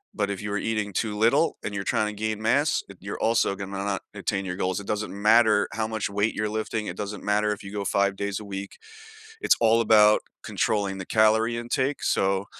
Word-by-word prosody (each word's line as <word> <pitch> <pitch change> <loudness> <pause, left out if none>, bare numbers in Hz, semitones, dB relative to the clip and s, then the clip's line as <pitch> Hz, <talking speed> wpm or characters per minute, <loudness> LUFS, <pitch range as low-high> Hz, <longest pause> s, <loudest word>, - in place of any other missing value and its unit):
But, 100 - -1
if 100 -1 -4
you 105 - -4
are 105 - 0
eating 110 -3 -2
too 105 -2 -2
little 130 +9 +3
and 105 - -4
you're 100 -1 -3
tryna 105 +1 0
gain 110 0 -2
mass, 140 +7 +2 0.2
you're 100 +2 -6
also 115 -3 +2
gonna 100 0 -7
not 100 -1 -2
attain 100 -1 -2
your 90 -1 -4
goals, 95 0 -1
it 100 - -9
doesn't 105 -1 -2
matter 105 +1 +4
how 110 0 -1
much 110 -1 -2
weight 105 +2 0
you're 105 0 -1
lifting, 110 0 -3
it 90 - -5
doesn't 105 0 -5
matter 105 +1 +1
if 105 - -5
you 100 - -8
go 100 -1 -3
5 100 +1 +1
days 100 -1 -3
a 105 - -9
week. 100 0 -7 0.6
It's - - +4
all 115 0 +4
about 105 -1 +5 0.2
controlling 100 -2 -1
the 95 - -6
calorie 110 +2 +3
intake, 130 +4 -1
so 95 +1 +1
105 Hz, 215 wpm, -25 LUFS, 100-110 Hz, 0.6 s, about